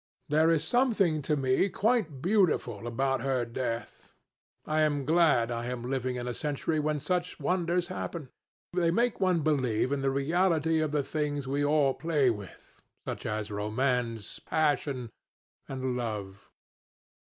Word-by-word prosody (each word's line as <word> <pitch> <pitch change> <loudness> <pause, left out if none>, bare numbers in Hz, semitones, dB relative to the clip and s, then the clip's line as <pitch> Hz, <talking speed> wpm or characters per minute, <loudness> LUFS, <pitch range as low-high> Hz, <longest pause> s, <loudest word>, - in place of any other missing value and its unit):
There 155 +2 +4
is 160 -2 +2
something 195 - +2
to 150 +2 0
me 130 +8 +2
quite 195 - 0
beautiful 170 - +1
about 135 +3 0
her 130 -3 0
death. 115 -1 -5 0.6
I 155 0 0
am 145 -3 +1
glad 155 -7 +3
I 120 0 -3
am 125 -1 -4
living 130 -1 -1
in 125 0 -4
a 125 - -2
century 150 +3 -1
when 150 0 0
such 180 +3 -2
wonders 175 +2 0
happen. 170 -6 -5 0.4
They 175 -2 +2
make 235 +7 +1
one 185 -3 +2
believe 130 -5 +1
in 140 -1 0
the 135 - +1
reality 160 +3 +2
of 155 -2 0
the 150 -1 +1
things 145 -1 -2
we 140 +2 0
all 145 -2 +3
play 150 -6 +2
with, 100 -5 -10 0.2
such - - -4
as 105 0 -3
romance, 115 +1 -1
passion, 145 -6 0 0.6
and 130 -1 -2
love." 105 -5 -5
145 Hz, 150 wpm, -29 LUFS, 125-165 Hz, 0.6 s, There